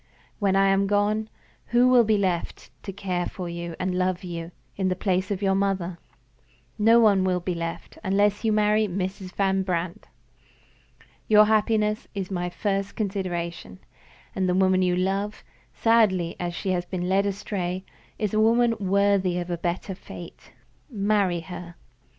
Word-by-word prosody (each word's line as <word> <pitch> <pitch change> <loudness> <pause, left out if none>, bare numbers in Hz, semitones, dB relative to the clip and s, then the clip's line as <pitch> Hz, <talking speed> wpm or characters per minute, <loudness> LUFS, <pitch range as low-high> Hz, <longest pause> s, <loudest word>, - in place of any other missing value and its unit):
When 195 -3 +2
I 195 0 +4
am 195 0 +2
gone, 210 +2 +1 0.4
who 240 +1 +4
will 250 -1 +6
be 215 -1 +2
left 185 -4 -2
to 195 - -6
care 185 -2 -2
for 180 -2 -6
you 170 -1 -5
and 185 0 -1
love 185 0 0
you, 170 -2 -5 0.3
in 190 -1 0
the 185 - 0
place 185 0 0
of 200 -1 -3
your 195 -1 +3
mother? 190 -3 -1 0.8
No 225 +2 +6
one 205 -4 +4
will 185 -1 +1
be 180 +1 -3
left, 165 0 -6
unless 205 +2 +2
you 220 - +2
marry 210 0 +3
Mrs. 185 0 -4
Van 195 -1 +1
Brandt. 175 -2 -3 1.2
Your 210 0 +7
happiness 215 0 +1
is 195 -1 -4
my 180 -1 -2
first 195 +2 -2
consideration, 175 - -3 0.6
and 185 -1 0
the 180 - +2
woman 185 0 +3
you 180 -1 +2
love 195 +3 -1 0.3
(sadly 205 -7 +2
as 175 -1 -3
she 190 - -2
has 180 -1 0
been 180 0 -4
led 195 +2 +2
astray) 190 -2 -3 0.3
is 210 -2 -2
a 215 - +2
woman 230 +2 +4
worthy 195 -2 +2
of 175 0 -4
a - - 0
better 175 +3 -3
fate. 175 -2 -11 0.4
Marry 200 -6 +1
her." 170 0 -9
190 Hz, 160 wpm, -25 LUFS, 180-205 Hz, 1.2 s, Your